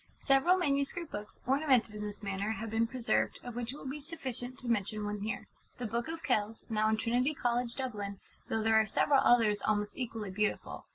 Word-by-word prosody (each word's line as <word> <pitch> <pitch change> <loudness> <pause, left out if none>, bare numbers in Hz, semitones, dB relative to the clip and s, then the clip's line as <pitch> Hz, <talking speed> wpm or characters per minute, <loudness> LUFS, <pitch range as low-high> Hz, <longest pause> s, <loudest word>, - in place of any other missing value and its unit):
Several 275 +7 +4
manuscript 290 0 0
books, 210 0 -7
ornamented 265 -4 +3
in 210 - -6
this 210 0 -6
manner, 200 +2 -1
have 225 0 -5
been 225 +1 +2
preserved, 245 0 0
of 245 -2 -7
which 240 0 -3
it 280 - -8
will - - -10
be 280 +3 -4
sufficient 260 -5 -5
to 255 - -8
mention 215 -2 0
one 205 0 -2
here 215 +4 -3 0.3
The 245 - -4
Book 235 +4 -2
of 325 0 -5
Kells, 220 -6 0
now 215 0 +3
in 220 - +2
Trinity 245 +6 +1
College, 240 -2 0
Dublin, 205 -7 -4 0.3
though 220 -1 0
there 220 0 +5
are 215 - -2
several 275 +4 +4
others 215 -4 +4
almost 205 -1 0
equally 225 -5 -4
beautiful. 210 +2 -2
230 Hz, 205 wpm, -32 LUFS, 215-265 Hz, 0.3 s, there